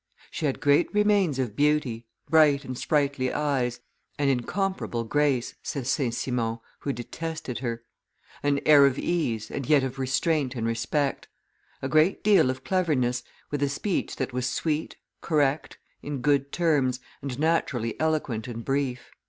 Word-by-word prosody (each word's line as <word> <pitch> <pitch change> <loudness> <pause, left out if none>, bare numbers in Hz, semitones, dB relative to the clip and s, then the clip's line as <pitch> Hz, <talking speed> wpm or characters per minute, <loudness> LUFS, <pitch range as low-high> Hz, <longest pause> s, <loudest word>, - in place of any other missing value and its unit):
"She 155 - -1
had 135 - -3
great 145 +3 +3
remains 205 -8 +3
of 125 -6 -2
beauty, 145 -6 +1 0.2
bright 150 -3 +4
and 130 - -5
sprightly 140 -2 0
eyes, 130 -5 -1 0.4
an 145 -1 +2
imcomparable 135 -1 -1
grace," 140 -3 +1
says 130 -3 -3
St. 130 -6 0
Simon, 115 -3 -1 0.2
who 140 - -2
detested 140 +1 -5
her; 115 -2 -4 0.6
"an 145 -1 +1
air 145 -2 +8
of 135 0 -1
ease, 115 -11 -1
and 135 - -4
yet 145 -3 +5
of 135 0 -4
restraint 135 +1 0
and 115 -2 -2
respect; 125 +5 -1 0.6
a - - 0
great 155 +6 +3
deal 200 -10 +5
of 130 0 -3
cleverness, 140 -10 +1 0.3
with 145 -1 -2
a 140 - +2
speech 180 +7 -2
that 130 -1 -3
was 125 0 -1
sweet, 155 +3 -2 0.3
correct, 145 -2 0 0.2
in 145 -3 -4
good 140 0 +2
terms, 145 -7 +1 0.2
and 130 -3 -5
naturally 140 -7 0
eloquent 150 -8 -1
and 115 -1 -6
brief." 135 -2 -2
140 Hz, 150 wpm, -26 LUFS, 125-150 Hz, 0.6 s, air